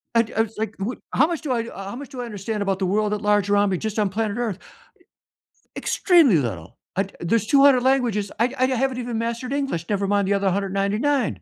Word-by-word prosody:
I 230 - +6
d 225 - -6
I 225 - +3
was 225 -1 -4
like, 220 -1 -3
what 205 +6 -4
how 275 - +4
much 335 -1 -3
do 300 -5 -3
I 235 -2 0
how 195 +3 -7
much 280 +1 -8
do 260 -3 -6
I - - -4
understand 210 -1 -4
about 195 -1 0
the 190 - 0
world 210 +2 +1
at 210 - -3
large 205 -1 +2
around 205 0 +3
me 185 - 0
just 220 -1 -4
on 210 -2 +2
planet 210 +2 -2
Earth? 225 -6 -2 1.2
Extremely 330 - +4
little. 95 - -4 0.2
I 195 0 0
there's 215 +5 0
200 275 -2 +5
languages. 245 -6 +1
I 240 +3 +2
I 255 - +4
haven't 260 0 0
even 240 -2 -3
mastered 235 +2 -3
English, 275 - -2
never 200 -1 0
mind 200 -1 +1
the 200 - +2
other 195 -1 +1
199. 200 - 0
215 Hz, 225 wpm, -23 LUFS, 200-250 Hz, 1.2 s, I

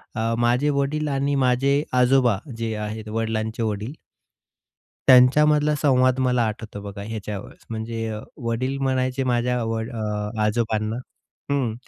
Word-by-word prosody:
अ, 115 0 0
माझे 120 +5 +2
वडील 150 +2 -1
आणि 140 0 0
माझे 135 +3 +2 0.2
आजोबा, 125 -4 +4 0.2
जे 115 -1 -2
आहेत 105 +1 -5
वडिलांचे 110 0 -2
वडील. 110 +4 -3 1.1
त्यांच्यामधला 150 +4 +6
संवाद 130 -2 +3
मला 125 -2 +2
आठवतो 110 -1 -6
बघा 100 0 -7
ह्याच्यावरच, 105 -3 -7
म्हणजे 115 -1 -4 0.2
वडील 130 +4 -1
म्हणायचे 130 0 0
माझ्या 125 -1 0
व 115 0 -2
अ, 105 -3 -3
आजोबांना 110 0 0 0.6
हं, 130 -6 0
120 Hz, 120 wpm, -23 LUFS, 110-130 Hz, 1.1 s, त्यांच्यामधला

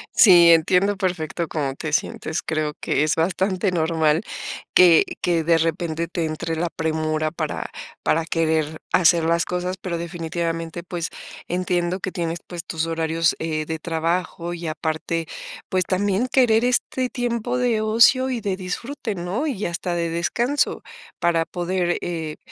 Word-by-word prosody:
Sí, 175 -6 +8
entiendo 180 +5 +3
perfecto 175 -3 -2
cómo 140 -4 -2
te 155 +1 -5
sientes. 155 - -1
Creo 155 -1 -2
que 145 - +1
es 155 - +1
bastante 185 +3 0
normal 160 -1 +2 0.5
que 175 -3 +7 0.2
que 170 -2 +1
de 165 +1 +4
repente 165 0 -1
te 170 -1 -2
entre 160 +1 -3
la 170 +1 -1
premura 155 -1 -1
para - - -4 0.3
para 160 +1 +2
querer 160 -1 0
hacer 170 -1 +5
las 165 +1 +2
cosas, 180 +1 -3
pero 175 -3 -4
definitivamente, 165 -1 -3
pues, 175 -2 -4 0.4
entiendo 180 0 -1
que 190 - -4
tienes, 170 -1 -3
pues, 175 -2 -7
tus 160 0 -2
horarios, 165 0 +1
eh, 155 -1 -2
de 160 0 -2
trabajo 170 +1 -2
y 170 0 -7
aparte, 160 +1 -2 0.4
pues, 185 -1 +1
también 200 +6 +1
querer 240 -3 +4
este 250 +1 0
tiempo 245 0 -2
de 235 -3 +1
ocio 230 +4 +5
y 240 -3 -2
de 195 -2 -1
disfrute, 220 +6 -4
¿no? 180 - -2
Y 225 -9 -2
hasta 175 +1 -3
de 170 -1 -1
descanso 240 - 0 0.4
para 170 -1 +2
poder, 175 0 -1
eh, 160 -3 -4
170 Hz, 150 wpm, -22 LUFS, 160-185 Hz, 0.5 s, Sí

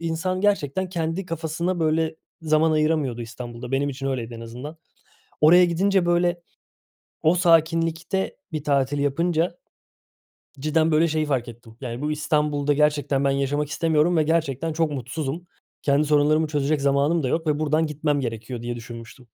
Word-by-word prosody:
insan 170 +3 -2
gerçekten 190 -3 0
kendi 170 +1 -2
kafasına, 165 +2 -2
böyle, 160 0 +1 0.3
zaman 155 0 +3
ayıramıyordu 155 -6 0
İstanbul'da, 120 +1 -8
benim 140 +2 +1
için 135 0 -5
öyleydi 120 -3 -3
en 115 - -8
azından. 125 +7 -8 0.6
Oraya 175 +4 +7
gidince, 185 +1 +1
böyle, 175 0 +2 0.8
o 160 +3 +4
sakinlikte 165 +1 +1
bir 155 -2 -4
tatil 140 -1 +1
yapınca, 165 +4 0 1.0
cidden, 155 +2 +2
böyle, 160 +2 +4
şeyi 155 -1 0
fark 130 -5 -1
ettim, 115 -1 -13
yani, 120 -2 -5
"Bu 150 +1 -1
İstanbul'da 150 -1 0
gerçekten 145 -2 +1
ben 140 - +3
yaşamak 140 +2 0
istemiyorum 160 +2 +2
ve 155 - +4
gerçekten 160 -1 0
çok 160 -1 0
mutsuzum. 145 +6 -4 0.4
Kendi 145 +1 +2
sorunlarımı 150 +1 +3
çözecek 145 0 0
zamanım 140 +4 +2
da 130 - -1
yok 160 +4 -1
ve 150 -1 +1
buradan 155 +1 +1
gitmem 150 -1 -1
gerekiyor." 115 0 -5
diye 120 0 -4
düşünmüştüm. 115 +1 -10
150 Hz, 150 wpm, -24 LUFS, 135-165 Hz, 1.0 s, Oraya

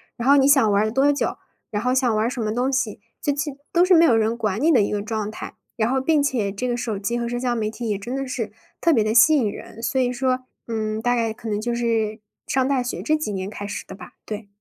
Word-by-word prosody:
然 240 +1 -3
后 280 +1 +7
你 270 - +5
想 270 -7 +5
玩 200 +1 +3
儿 215 - +1
多 270 +5 +3
久， 285 - -2 0.3
然 210 +1 -3
后 250 0 +2
想 250 -4 +2
玩 215 - +2
儿 - - +2
什 245 -1 -3
么 215 -1 -1
东 250 +4 0
西， 245 -7 -1 0.2
就 290 - +1
去 290 0 -2 0.2
都 350 +1 +4
是 365 - +4
没 335 0 +7
有 235 -8 +5
人 220 +1 +1
管 215 -2 -1
你 320 +4 +3
的 245 -7 +5
一 200 - 0
个 205 -1 -1
状 215 -1 -3
态。 215 - -8 0.2
然 225 +2 +1
后 265 0 +1
并 300 0 +2
且 230 -8 0
这 230 +6 -3
个 240 - 0
手 230 -3 -3
机 235 +5 -2
和 235 - -2
社 245 - -2
交 245 -1 0
媒 220 -2 -1
体 230 +1 -6
也 205 -2 -1
真 240 +6 -5
的 270 - -2
是 225 -5 -3 0.3
特 335 - +4
别 230 -8 +3
地 215 - 0
吸 245 +7 +7
引 255 -7 +2
人。 220 - -10
所 265 +1 +1
以 245 0 +1
说， 255 0 0 0.3
嗯， 215 -1 -2
大 245 0 +2
概 230 -2 0
可 230 0 -10
能 210 0 -1
就 240 +1 -1
是 225 -2 0 0.3
上 265 -1 +1
大 270 -2 +1
学 245 - -4
这 310 - +2
几 305 -9 -3
年 190 -1 -3
开 205 0 -6
始 205 - -5
的 - - -10
吧， 185 -2 -12
对。 210 -1 -6
235 Hz, 310 characters per minute, -23 LUFS, 215-265 Hz, 0.3 s, 后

